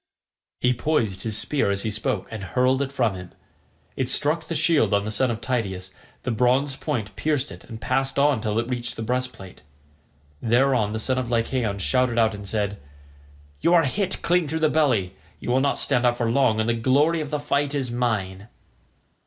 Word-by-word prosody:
He 125 0 +3
poised 120 -8 -1
his 110 0 -2
spear 140 -2 0
as 100 0 -1
he 110 - -1
spoke 110 -1 -2
and 110 -3 -6
hurled 130 +5 +1
it 140 -1 -2
from 120 -7 +1
him. 90 -1 -9 0.6
It 130 -2 -2
struck 155 +4 +1
the 165 - -3
shield 155 -12 +3
of 100 0 0
the 110 - -3
son 125 +4 +1
of 115 -2 -3
Tydeus; 95 -7 -3 0.3
the 125 - -1
bronze 125 +4 +2
point 110 -5 -3
pierced 145 -6 -1
it 90 0 -11
and 110 - -9
passed 135 +4 -1
on 140 -4 +3
till 105 0 -1
it 115 0 0
reached 120 -1 -3
the 115 - -5
breastplate. 125 -5 -4 0.8
Thereon 120 -2 +2
the 110 - -2
son 130 +3 0
of 125 -2 -3
Lycaon 115 -2 0
shouted 125 +4 +1
out 110 -1 +3
and 100 -1 -8
said, 105 -1 -2 0.8
"You 170 - +3
are 165 - +5
hit 190 +7 -2
clean 175 -2 +2
through 160 +2 -3
the 155 - +4
belly; 120 -12 +2 0.3
you - - -3
will 130 - +3
not 140 0 +1
stand 130 -3 +2
out 120 -1 +2
for 115 -2 0
long, 120 -4 +3
and 110 - 0
the 120 - +2
glory 140 +8 +2
of 150 - -5
the 150 - -1
fight 145 0 -1
is 130 -4 -2
mine." 105 -5 -2
125 Hz, 200 wpm, -24 LUFS, 110-140 Hz, 0.8 s, are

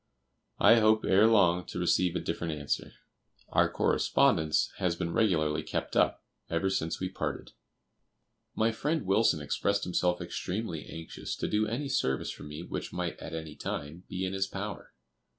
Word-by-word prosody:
I 115 - +7
hope 110 0 +4
ere 100 +4 +5
long 90 -6 +4
to - - -6
receive 90 0 +2
a - - +1
different 85 -1 -3
answer. 70 -1 -2 0.6
Our - - +3
correspondence 80 -1 +2
has 90 -2 0
been 85 -1 -3
regularly 80 -9 +2
kept - - -4
up - - +2 0.3
ever 85 +3 0
since 80 -4 -1
we 95 - -1
parted. 95 - -4 1.0
My 110 +1 +2
friend 150 +5 -1
Wilson 95 -4 +3
expressed 100 +7 0
himself 90 0 +1
extremely 90 0 -4
anxious 80 0 -6
to - - -3
do 105 +1 +1
any 125 +6 -2
service 65 - 0
for - - -11
me 75 +3 -7
which - - -5
might - - -3
at 80 - -6
any 80 -2 -6
time 80 +5 -5
be 95 -1 -2
in 95 - -3
his 95 0 0
power. - - -6
90 Hz, 165 wpm, -30 LUFS, 80-105 Hz, 1.0 s, I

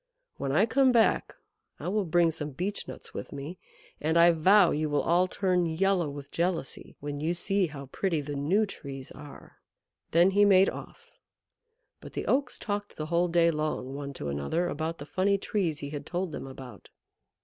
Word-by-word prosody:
When 135 - -2
I 185 +10 +4
come 260 +2 +3
back 230 -2 +2 0.4
I - - -5
will 205 +1 0
bring 170 0 +3
some 150 -2 -6
Beech 190 +8 -3
nuts - - -9
with - - -6
me, 145 +5 -7 0.4
and 160 +2 +1
I 170 +1 +7
vow 185 +3 +5
you 155 +1 -1
will 145 0 +1
all 175 +2 +3
turn 180 -2 +1
yellow 175 0 +1
with 140 0 -9
jealousy 170 -4 -2
when 145 0 -4
you 165 +4 -1
see 195 +2 +1
how 140 -3 -8
pretty 165 +5 -1
the 145 0 -5
new 175 +10 +2
Trees 135 -8 -9
are." 145 -1 -12 0.5
Then 175 +3 +4
he 205 +1 +4
made 195 -1 +5
off. 470 +1 -12 0.8
But - - -12
the - - -4
Oaks 265 -1 +1
talked 205 -1 -4
the 155 - -4
whole 175 +1 +3
day 170 -1 +3
long 150 -4 -3
one 140 0 -5
to 75 - -5
another 70 - -1
about 160 +1 -3
the 145 - -8
funny 195 +5 +1
Trees 180 -7 -2
he 145 0 -5
had 145 -2 -6
told 180 0 -2
them 135 - -6
about. 130 -2 -11
170 Hz, 190 wpm, -28 LUFS, 145-190 Hz, 0.8 s, I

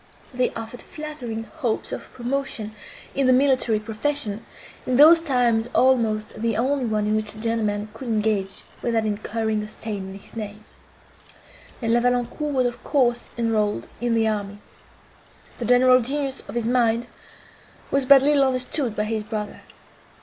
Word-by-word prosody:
They 250 0 +1
offered 225 +2 -6
flattering 275 -8 -6
hopes 245 -2 -3
of - - -6
promotion 245 -4 -3 0.4
in 275 -1 +1
the - - +6
military 255 -4 +3
profession, 225 0 -1 0.4
in 255 - +1
those 315 +5 +9
times 245 -7 +1
almost 225 -5 +2
the 230 -2 0
only 265 +2 +1
one 215 -2 0
in 215 +1 +1
which 215 0 -1
a - - -11
gentleman 215 -2 -1
could 245 +3 -8
engage 210 -3 0 0.2
without 230 -2 0
incurring 215 +1 -1
a 210 - -6
stain 210 -3 -6
on 195 - -8
his 200 - -16
name; 210 -1 -7 1.2
and 230 0 +2
La 240 - +4
Valancourt 245 +5 0
was 260 -3 +1
of 240 -1 -3
course 245 -4 +1
enrolled 215 - 0
in 240 -1 +1
the 225 -1 +2
army. 205 -2 -2 1.0
The 240 - -3
general 255 +1 +5
genius 275 +2 -2
of - - -8
his 235 -2 -1
mind 235 -1 +2 0.9
was 275 0 +2
but 275 -1 +8
little 290 -1 +4
understood 255 -1 -1
by 210 - 0
his 215 0 -2
brother. 210 -1 -5
230 Hz, 155 wpm, -23 LUFS, 215-255 Hz, 1.2 s, those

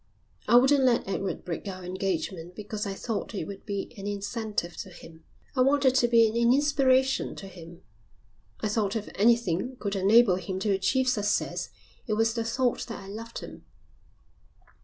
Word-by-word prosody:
"I - - +5
wouldn't 265 +3 +6
let 245 -5 +2
Edward 195 0 -3
break 175 +3 -5
our 185 -1 -6
engagement 180 -1 -3
because 210 0 -5
I 195 - -4
thought 220 0 -4
it 190 - -3
would 200 +4 -9
be 200 +1 -4
an 195 - -5
incentive 205 -3 -3
to - - -6
him. 165 -2 -14 0.3
I 255 - +2
wanted 270 0 +4
to 250 -2 +3
be 230 -1 +5
an 220 - -4
inspiration 265 +1 +3
to 195 - -9
him. 170 -2 -12 0.8
I - - 0
thought 210 -1 0
if 215 -2 -3
anything 230 +1 +2
could 200 -1 -3
enable 200 0 +5
him 185 +1 -4
to 205 - +1
achieve 225 +7 +1
success 210 -5 0 0.4
it 215 - 0
was 225 +1 +2
the 230 -1 -2
thought 245 +2 -1
that 230 - -6
I 195 - -10
loved 230 +3 -7
him. - - -10
210 Hz, 175 wpm, -27 LUFS, 195-240 Hz, 0.8 s, wouldn't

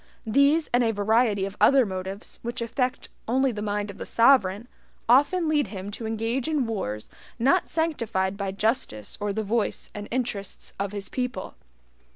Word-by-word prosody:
These 280 +7 +3
and 245 0 +4
a 230 - +2
variety 215 -1 +2
of 195 +1 -6
other 270 -2 +6
motives, 190 +1 -6
which 235 +1 -4
affect 250 +2 -2 0.2
only 260 +3 +2
the 210 -2 -5
mind 205 0 -2
of 200 - -15
the - - -5
sovereign, 230 -3 +4 0.4
often 290 +8 +4
lead 300 -5 +2
him 195 0 -6
to 220 +2 -5
engage 225 +4 -1
in 300 -5 +1
wars 105 - -3 0.3
not 275 +10 +3
sanctified 230 -12 -1
by 200 -1 -3
justice 195 - -1
or 205 0 0
the 220 +2 -2
voice 220 +2 -1
and 205 0 -6
interests 235 -5 -3
of 200 0 -1
his 200 -2 -5
people. 250 -7 -4
225 Hz, 170 wpm, -26 LUFS, 200-255 Hz, 0.4 s, other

